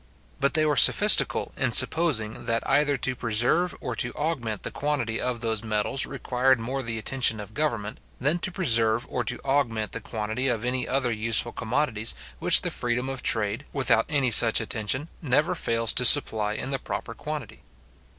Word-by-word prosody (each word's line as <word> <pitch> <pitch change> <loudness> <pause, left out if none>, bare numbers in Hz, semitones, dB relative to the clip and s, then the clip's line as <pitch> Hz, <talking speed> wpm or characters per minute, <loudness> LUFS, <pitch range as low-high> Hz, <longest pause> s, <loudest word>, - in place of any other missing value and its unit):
But 140 - -1
they 155 -1 +4
were 150 -1 0
sophistical, 210 +10 +5
in 130 -4 -1
supposing, 130 -6 +2
that 115 0 -2
either 145 -1 +1
to 130 +1 -2
preserve 120 +10 0
or 125 - -5
to 120 - 0
augment 125 -9 -4
the - - -5
quantity 140 -6 -3
of 125 -2 -3
those 110 -2 -2
metals 110 +4 -1
required 130 -1 -1
more 130 +4 -4
the 115 -3 -4
attention 115 0 0
of 105 +1 -9
government, 115 -7 -3 0.2
than 150 +7 0
to 185 - -3
preserve 115 - +2
or 125 - -3
to 110 - -3
augment 115 -6 -2
the 115 - -7
quantity 110 +3 -3
of 120 -2 -1
any 125 0 -1
other 130 -2 -1
useful 115 +1 0
commodities, 115 -3 -2 0.2
which - - +5
the - - -2
freedom 125 +2 -3
of 135 -1 -5
trade, 110 +4 -1
without 130 -5 +2
any 135 -4 0
such 115 +1 +7
attention, 110 +6 -1
never 150 -1 0
fails 115 0 0
to 125 - +1
supply 110 -6 +4
in 130 +5 -5
the 135 - -1
proper 115 - -7
quantity. 150 +4 -8
125 Hz, 180 wpm, -24 LUFS, 110-135 Hz, 0.2 s, such